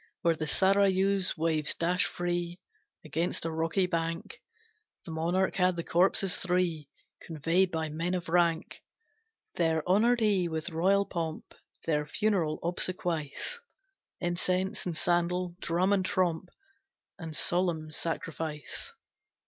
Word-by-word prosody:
Where 170 -1 +4
the 155 0 -3
Sarayu's 195 +2 +3
waves 155 -2 +1
dash 175 +1 +2
free 175 0 -2 0.5
Against 165 +2 -1
a 165 - -1
rocky 165 +4 +1
bank, 165 - -3 0.6
The 165 - -7
monarch 175 +5 0
had 185 -1 +3
the 170 - -3
corpses 185 +2 +2
three 175 -5 0 0.3
Conveyed 165 +4 +1
by 160 -2 -2
men 165 +4 -1
of 180 0 -4
rank; 170 0 +1 0.8
There 160 -1 +1
honoured 230 +6 +4
he 200 -5 +2
with 160 +2 -4
royal 195 +5 +3
pomp 165 -4 -4 0.3
Their 150 -2 0
funeral 190 -8 +1
obsequies, 175 - -2 0.6
Incense 185 +2 -1
and 170 -3 -3
sandal, 175 0 0
drum 180 +4 +1
and 195 -2 +2
tromp, 180 -1 0 0.7
And 160 -2 -6
solemn 170 -3 0
sacrifice. 155 -2 -4
175 Hz, 120 wpm, -30 LUFS, 160-185 Hz, 0.8 s, Where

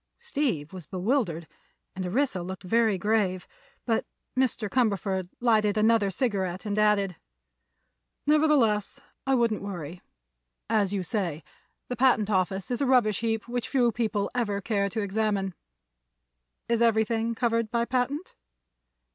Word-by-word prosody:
Steve 275 - -2
was 180 -5 -9
bewildered, 185 - -1 0.5
and 190 - -3
Orissa 225 -1 0
looked 185 +2 -6
very 220 +1 +2
grave. 195 -2 0 0.4
But 225 -2 +1 0.3
Mr. 255 -4 +1
Cumberford 200 -5 0
lighted 215 -3 +3
another 215 -1 +4
cigarette 190 -3 -2
and 210 0 -1
added: 200 -4 +2 1.1
"Nevertheless, 290 -9 +3 0.3
I 270 - +4
wouldn't 230 -3 +1
worry. 175 -4 -6 0.7
As 205 -3 +2
you 200 -2 -1
say, 170 -5 -2 0.4
the 250 - -3
patent 235 -4 +3
office 190 +2 0
is 245 - -1
a 275 - +2
rubbish 240 -6 +3
heap 225 -1 -1
which 245 -1 -3
few 245 -4 +3
people 215 -3 -1
ever 215 -5 -1
care 200 -1 0
to 220 +3 -2
examine. 200 -2 -1 1.1
Is 235 0 +1
everything 230 0 +2
covered 230 -1 0
by 235 +1 0
patent?" 260 +7 -2
215 Hz, 130 wpm, -27 LUFS, 195-235 Hz, 1.1 s, another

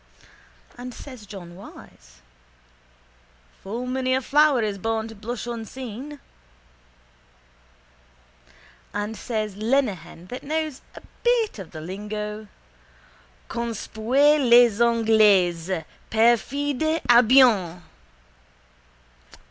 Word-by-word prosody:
_ - - -26 0.6
And 250 0 -7
says 255 -7 -11
John 175 -4 -10
Wyse: 185 - -15 1.4
—Full 230 +6 -5
many 255 0 0
a 260 - 0
flower 290 -3 +3
is 205 -2 -3
born 225 +2 -2
to - - -9
blush 225 +3 -6
unseen. 245 +4 -7 2.8
And 205 +2 -3
says 215 -3 -4
Lenehan 210 - -1
that 250 - -6
knows 310 -1 -3
a - - -11 0.2
bit 475 - +1
of 190 - -8
the 155 - -9
lingo: 210 +4 -6 1.0
—_Conspuez 240 +5 +1
les 235 -2 +6
Anglais! 200 -7 +3 0.2
Perfide 280 +7 +1
Albion! 235 -8 +5
230 Hz, 90 wpm, -24 LUFS, 205-260 Hz, 2.8 s, les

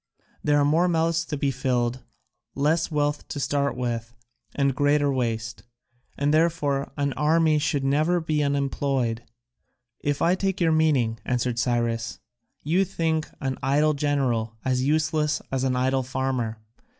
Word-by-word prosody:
There 145 0 +3
are 145 - +3
more 160 +5 +3
mouths 165 -1 +1
to 150 - -4
be 140 0 0
filled, 125 -1 -1 0.5
less 155 +4 +1
wealth 145 -1 -1
to 145 - -5
start 140 -1 0
with, 120 -1 -3 0.4
and 140 -1 +2
greater 145 +1 +2
waste; 115 -3 -2 0.6
and 145 +1 +1
therefore 155 -4 +1
an 140 -1 0
army 155 0 +3
should 145 -2 0
never 155 +6 +2
be 155 -2 -1
unemployed." 135 -4 0 0.8
"If 145 0 -1
I 175 - +3
take 190 +1 -1
your 165 -2 +3
meaning," 140 -8 +2
answered 125 -1 -1
Cyrus, 115 -2 -1 0.5
"you 170 +6 +2
think 165 -4 -1
an 130 -2 -2
idle 145 +3 +2
general 135 -6 0
as 130 -1 +1
useless 150 +1 +1
as 135 -1 -1
an 130 -1 +1
idle 130 +1 +1
farmer. 130 -3 -2
140 Hz, 145 wpm, -25 LUFS, 125-155 Hz, 0.8 s, There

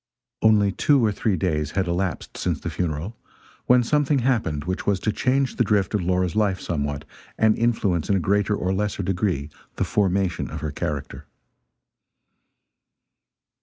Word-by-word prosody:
Only 105 -2 +4
two 135 +4 +3
or 105 - +2
three 100 0 0
days 75 -4 -1
had 95 -2 +1
elapsed 90 0 -2
since - - -2
the - - -5
funeral, 85 +5 -3 0.5
when 125 0 +5
something 145 +3 +2
happened 115 - 0
which 90 +3 -4
was 100 -2 +2
to 110 - +1
change 135 +4 0
the - - +4
drift 105 -2 +1
of 105 - +1
Laura's 90 -1 0
life 100 -3 +1
somewhat, 75 -3 -3 0.3
and 110 -1 +4
influence 105 -8 0
in 100 - +3
a - - +2
greater 100 +3 +1
or 95 -1 -1
lesser 100 0 -1
degree 90 -6 -1 0.2
the - - 0
formation 95 -3 0
of - - -6
her 75 - -3
character. 75 -2 -5
95 Hz, 160 wpm, -23 LUFS, 85-110 Hz, 0.5 s, when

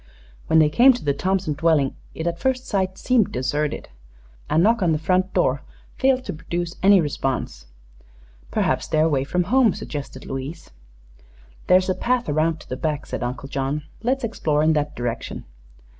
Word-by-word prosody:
When 160 - +4
they 155 -1 +6
came 255 - +7
to 245 - -7
the 140 - +2
Thompson 185 +1 -1
dwelling 150 -3 +2 0.2
it 160 - -4
at 170 0 -2
first 260 +2 0
sight 190 -2 -1
seemed 250 -5 +2
deserted. 145 +4 -2 0.6
A - - +1
knock 220 +7 +4
on 170 -3 +3
the - - +1
front 185 +4 +1
door - - +2 0.3
failed 260 -1 +2
to - - -4
produce 170 +2 -4
any 195 0 +6
response. 135 - -2 0.8
"Perhaps - - 0
they're 155 -1 +2
away 140 -5 +1
from 180 +6 0
home," 230 +2 +3
suggested 140 -3 -7
Louise. 135 +5 -6 1.0
"There's 185 0 +5
a 185 - +2
path 245 +4 0
around 155 +2 +1
to - - -15
the 130 - -4
back," 150 +1 -2
said - - -5
Uncle 125 +2 -4
John. 140 +2 -2 0.2
"Let's 260 +3 0
explore 155 -9 0
in 160 +1 +4
that 150 -1 -1
direction." 120 -1 -4
160 Hz, 175 wpm, -23 LUFS, 145-195 Hz, 1.0 s, came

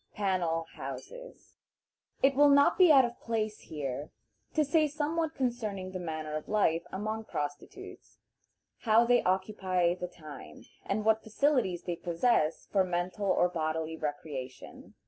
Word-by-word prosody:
"Panel 180 -5 0
Houses." - - -9 0.7
It 270 0 +5
will 290 +2 +6
not 280 0 +5
be 360 -4 +6
out 270 -3 +7
of 240 0 -6
place 220 -2 -2
here 145 -1 -5 0.5
to 305 - +3
say 305 +2 +3
somewhat 310 +2 -2
concerning 215 -7 -2
the 185 - -5
manner 155 -3 -4
of 155 - -5
life 170 -6 +2
among 215 +3 -4
prostitutes; 145 -5 -7 0.6
how 225 0 +4
they 245 0 +4
occupy 185 -2 +1
the 180 0 -5
time, 155 -5 -12 0.2
and 210 +2 -2
what 220 0 +3
facilities 220 - 0
they 175 -2 -3
possess 170 -2 +1
for 195 -2 +3
mental 180 +3 -2
or 180 - +3
bodily 160 -1 -2
recreation. 145 -4 -7
190 Hz, 140 wpm, -30 LUFS, 165-240 Hz, 0.7 s, out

